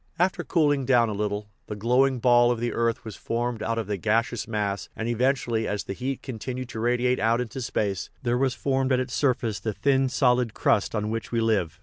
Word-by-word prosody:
After 180 +2 +1
cooling 145 -5 +2
down 120 -3 +4
a - - -2
little, 105 0 -2 0.2
the 105 - -5
glow 125 +6 +3
ing 135 -1 -2
ball 120 0 +5
of 120 -2 0
the 120 +1 -1
earth 115 -1 -1
was 110 - -7
formed 120 -1 -3
out 115 0 -1
of 115 - -1
the 105 -1 -2
gaseous 115 +3 0
mass, 105 -3 -2
and 110 - -3
eventually, 120 -1 0
as 105 0 -2
the - - -5
heat 130 +5 -4
continued 130 0 -5
to 110 - -6
radiate 125 +2 +1
out 115 +2 +2
into 125 +2 -4
space, 100 -5 -2
there 120 -1 +1
was 130 0 +1
formed 135 -1 0
at 130 - +3
its 125 -1 -3
surface 120 -6 0
the 110 - -3
thin 135 +2 +2
solid 125 -3 +2
crust 105 +1 +1
on 105 0 -1
which 115 0 -4
we 115 - +1
live. 110 -8 0
120 Hz, 225 wpm, -26 LUFS, 110-130 Hz, 0.2 s, ball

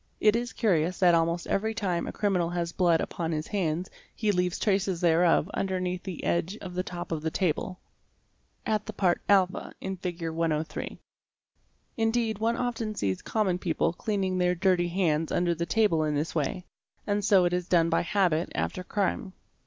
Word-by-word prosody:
It 215 0 +4
is 240 +1 -1
curious 180 -5 +1
that 180 -2 +5
almost 170 +1 +1
every 220 +2 -1
time 185 -5 -1
a - - -3
criminal 185 -5 0
has 170 -1 -2
blood 170 -3 +3
upon 165 -1 -3
his 155 -1 -2
hands 180 -3 -1 0.3
he 215 -2 +1
leaves 180 -2 0
traces 195 -3 +1
thereof 170 -1 +3
underneath 185 -2 -2
the 185 -4 -7
edge 175 +4 0
of 180 -2 -8
the 180 - -1
top 175 -1 -6
of 160 -2 -2
the 160 - -1
table 180 +1 -1 0.9
(at 215 -1 -1
the - - -5
part 180 -3 +1
a 190 -2 +2
in 190 0 -4
Fig. 175 -2 -4
103). 160 -1 -2 1.0
Indeed 225 -1 +1
one 230 +2 +1
often 225 -3 -2
sees 95 - -1
common 195 -5 0
people 165 -1 0
cleaning 190 -2 -1
their 180 0 +2
dirty 180 -1 +2
hands 165 -3 0
under 175 -1 +2
the 170 +1 -3
table 205 -8 +2
in 150 -1 0
this 150 +3 -1
way, 170 +4 -2 0.4
and 205 0 0
so 195 -2 +5
it 175 - +1
is 180 -1 -1
done 165 -2 +3
by - - +3
habit 175 -3 +1
after 185 - -2
crime. 195 0 -2
180 Hz, 180 wpm, -28 LUFS, 170-200 Hz, 1.0 s, that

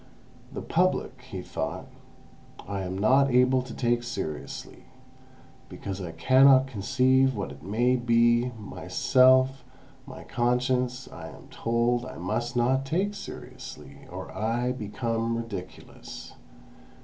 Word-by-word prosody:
"The - - -6
Public," - - 0
he - - -6
thought, - - -4 0.8
"I 100 0 -3
am 95 0 -4
not 130 +7 +4
able 125 +1 +4
to 125 -1 -9
take 120 -1 0
seriously, 120 - -6 0.8
because 95 -1 -6
I 85 -3 -5
cannot 130 +9 +6
conceive 130 +3 +2
what 100 - -4
it 70 - -12
may 120 +8 +1
be; 120 0 +3
myself, 130 +5 +3 0.4
my 130 - -9
conscience, 125 +1 0
I 80 -1 -8
am - - -13
told 120 +1 0
I - - -9
must 120 +8 -2
not 130 +3 +2
take 185 +9 -1
seriously, 70 - -10
or - - -7
I 120 +3 0
become 115 0 -2
ridiculous. 100 -6 -8
120 Hz, 120 wpm, -27 LUFS, 110-130 Hz, 0.8 s, cannot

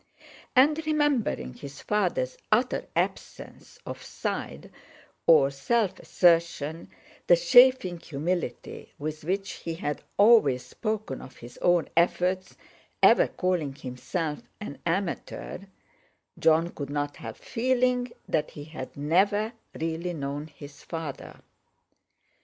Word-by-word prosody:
And, 295 +5 +5
remembering 285 - +1
his 140 0 -10
father's 180 -11 0 0.2
utter 240 +4 +2
absence - - -4
of - - -7
"side" - - -5 0.6
or 145 -4 +6
self 200 - 0
assertion, 165 -3 +2 0.4
the - - +7
chaffing 255 - +5
humility 160 -2 -4
with 155 +1 -5
which 195 +4 -2
he 165 -1 -4
had 150 -4 -3 0.2
always 200 - +5
spoken 215 - -4
of 130 - -12
his 120 +1 -12
own 175 -2 +3
efforts, 180 +2 +1 0.5
ever - - +7
calling 175 -7 -1
himself 145 +4 -4 0.2
"an 210 -9 -7
amateur," 180 +1 -3 0.8
Jon 165 +1 +4
could 140 -2 -6
not 145 0 -3
help 115 -1 -8
feeling 250 0 0 0.2
that 155 - 0
he 145 - -9
had 145 -4 -8
never 200 +9 +2 0.3
really 165 +2 -2
known 145 0 -4
his 145 -1 -13
father. 160 -4 -7
170 Hz, 110 wpm, -27 LUFS, 145-210 Hz, 0.8 s, the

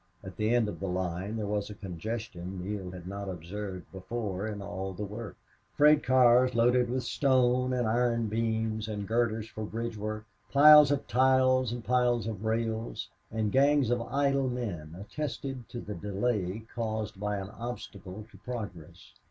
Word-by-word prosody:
At 95 -1 -8
the 110 0 0
end 120 -2 +3
of 105 - -5
the 95 - -3
line 90 +3 -2
there 110 - -2
was 105 0 -2
a 105 - -7
congestion 95 -1 -5
Neale 95 0 -4
had 90 -1 -9
not 100 +1 -5
observed 95 +2 -6
before 100 +1 -4
in 105 -2 -4
all 95 -1 -5
the 105 +3 -4
work. 105 0 -7 0.4
Freight 150 0 +6
cars, 125 0 +5
loaded 120 +1 +4
with 130 +1 -1
stone 125 -1 +2
and 125 -2 +1
iron 115 0 +2
beams 110 0 -1
and 105 -2 -4
girders 115 -1 0
for 110 -1 -7
bridge 115 +2 -4
work, 110 +1 -4 0.3
piles 150 0 +9
of 145 -1 0
ties 130 -1 +3
and 120 -1 -5
piles 120 -2 +2
of 110 -2 -4
rails, 115 0 -2 0.2
and 110 -2 -1
gangs 140 -2 +4
of 120 -1 +1
idle 135 +1 +1
men 90 -10 -4
attested 135 +2 -5
to 120 - -6
the 105 - -6
delay 105 +2 -2
caused 110 -3 -3
by 105 0 -1
an 95 +1 -6
obstacle 105 -5 -7
to - - -15
progress. 90 -8 -7
110 Hz, 170 wpm, -30 LUFS, 100-125 Hz, 0.4 s, piles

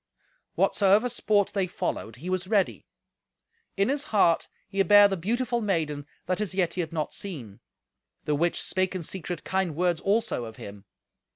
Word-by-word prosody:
Whatsoever 205 +4 +3
sport 205 -4 +1
they 195 -2 0
followed, 115 -9 -4
he 160 +9 -7
was 185 0 -1
ready. 200 -2 0 0.9
In 195 +1 +3
his 285 +2 -1
heart 195 - +3 0.2
he 195 0 0
bare 205 +1 +7
the 195 - -1
beautiful 235 +6 -1
maiden 155 -8 -1 0.2
that 185 +3 -1
as 190 -3 -2
yet 185 -3 +1
he 180 - -1
had 160 -1 -5
not 155 -2 -3
seen: 130 - -6 0.7
the 150 - +1
which 170 +4 +1
spake 185 0 0
in 180 - -3
secret 175 0 -4
kind 190 -5 -1
words 175 0 +1
also 215 - 0
of 110 -1 -9
him. 100 -1 -10
185 Hz, 170 wpm, -27 LUFS, 165-205 Hz, 0.9 s, bare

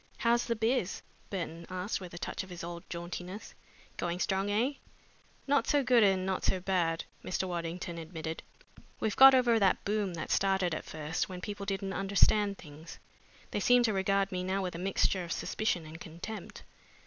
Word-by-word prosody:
"How's 235 0 +2
the 235 - 0
biz?" 225 -3 0 0.3
Burton 170 -3 -5
asked 185 +3 -3
with 180 -2 -8
a - - -6
touch - - -3
of 190 - -10
his 175 -2 -7
old 170 0 -6
jauntiness. 180 +3 -6 0.4
"Going 175 0 -2
strong, 195 +1 0
eh?" 230 +7 +1 0.7
"Not 280 0 +2
so 290 -2 +3
good 250 -2 +5
and 190 -2 +3
not 190 -1 -1
so 190 - +1
bad," 175 -3 0 0.2
Mr. 185 +1 -1
Waddington 170 0 -4
admitted. 160 -1 -5 0.6
"We've 215 -2 -1
got 270 0 +10
over 240 -3 +4
that 195 -3 +2
boom 205 -3 0
that 165 - -5
started 190 -3 +2
at - - -4
first 155 +4 -3
when 180 -1 -6
people 205 +1 -6
didn't 195 -1 -2
understand 200 +1 +3
things. 155 +1 -11 0.5
They - - -1
seem 245 0 +5
to 220 -3 +2
regard 195 0 +1
me 180 -1 -2
now 190 +1 -1
with 180 - -3
a 170 - -6
mixture 190 0 +1
of 170 - -7
suspicion 185 -5 -1
and 160 +2 -10
contempt. 175 +7 -8
190 Hz, 185 wpm, -31 LUFS, 175-205 Hz, 0.7 s, got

